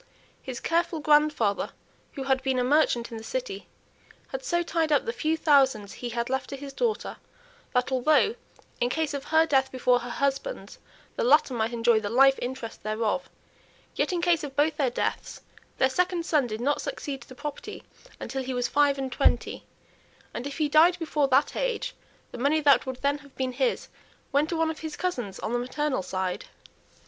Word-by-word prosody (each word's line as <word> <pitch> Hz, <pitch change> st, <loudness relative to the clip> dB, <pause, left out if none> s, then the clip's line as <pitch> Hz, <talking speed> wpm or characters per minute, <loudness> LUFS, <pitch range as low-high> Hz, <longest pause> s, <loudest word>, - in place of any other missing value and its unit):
His 255 Hz, -2 st, -6 dB
careful 340 Hz, 0 st, 0 dB
grandfather, 295 Hz, -9 st, +2 dB, 0.4 s
who 275 Hz, -, -5 dB
had 265 Hz, -1 st, +1 dB
been 265 Hz, -1 st, 0 dB
a 250 Hz, -, +2 dB
merchant 250 Hz, -4 st, +2 dB
in 230 Hz, -, -5 dB
the -, -, -11 dB
city, -, -, -5 dB, 0.6 s
had -, -, -5 dB
so 345 Hz, -8 st, 0 dB
tied 330 Hz, -2 st, 0 dB
up 290 Hz, -, +3 dB
the 465 Hz, -, -2 dB
few 320 Hz, -7 st, 0 dB
thousands 265 Hz, -10 st, +3 dB
he 245 Hz, -, -6 dB
had 235 Hz, 0 st, -2 dB
left 265 Hz, 0 st, -2 dB
to 275 Hz, -, -5 dB
his 275 Hz, 0 st, -8 dB
daughter, 455 Hz, -, -2 dB, 0.6 s
that 250 Hz, +1 st, +1 dB
although, 295 Hz, -, +3 dB, 0.5 s
in 245 Hz, -, +1 dB
case 310 Hz, +2 st, -1 dB
of 280 Hz, -1 st, -4 dB
her 320 Hz, +1 st, +4 dB
death 270 Hz, -4 st, +2 dB
before 250 Hz, -1 st, +2 dB
her 245 Hz, 0 st, -7 dB
husband's, 280 Hz, -, -2 dB, 0.4 s
the -, -, 0 dB
latter 280 Hz, +2 st, +4 dB
might 225 Hz, -1 st, -1 dB
enjoy 235 Hz, -1 st, +3 dB
the 205 Hz, -1 st, -4 dB
life 270 Hz, +3 st, +5 dB
interest 245 Hz, -2 st, -5 dB
thereof, 215 Hz, 0 st, -1 dB, 0.6 s
yet, -, -, 0 dB
in 350 Hz, -1 st, -1 dB
case 345 Hz, -3 st, +3 dB
of 275 Hz, -2 st, -6 dB
both 300 Hz, +2 st, +2 dB
their 275 Hz, -4 st, +2 dB
deaths, 240 Hz, -, -3 dB, 0.4 s
their 260 Hz, -, +4 dB
second 355 Hz, +4 st, 0 dB
son 295 Hz, -7 st, +2 dB
did 220 Hz, 0 st, -5 dB
not 285 Hz, +4 st, +1 dB
succeed 275 Hz, -3 st, -5 dB
to -, -, -15 dB
the 255 Hz, -, -11 dB
property 290 Hz, +2 st, -7 dB, 0.4 s
until 265 Hz, 0 st, -4 dB
he 260 Hz, 0 st, -4 dB
was 245 Hz, 0 st, 0 dB
five 285 Hz, -1 st, +3 dB
and 265 Hz, -1 st, -3 dB
twenty; -, -, +1 dB, 0.7 s
and 245 Hz, -, -4 dB
if 285 Hz, -, -7 dB
he 310 Hz, -2 st, +1 dB
died 325 Hz, +4 st, +5 dB
before 305 Hz, -4 st, 0 dB
that 270 Hz, +2 st, +2 dB
age, -, -, -2 dB, 0.4 s
the -, -, -8 dB
money 285 Hz, +5 st, +2 dB
that 285 Hz, -3 st, +4 dB
would 260 Hz, 0 st, -6 dB
then 285 Hz, +1 st, +1 dB
have 280 Hz, -2 st, -18 dB
been 260 Hz, -1 st, -2 dB
his 475 Hz, -, -1 dB, 0.4 s
went 290 Hz, +3 st, +2 dB
to 335 Hz, -, -1 dB
one 325 Hz, 0 st, +1 dB
of 320 Hz, -, -9 dB
his 315 Hz, -1 st, -6 dB
cousins 245 Hz, -, -3 dB
on 220 Hz, -, -3 dB
the 240 Hz, -, +1 dB
maternal 260 Hz, +1 st, -1 dB
side. 185 Hz, 0 st, -3 dB
275 Hz, 195 wpm, -27 LUFS, 250-315 Hz, 0.7 s, life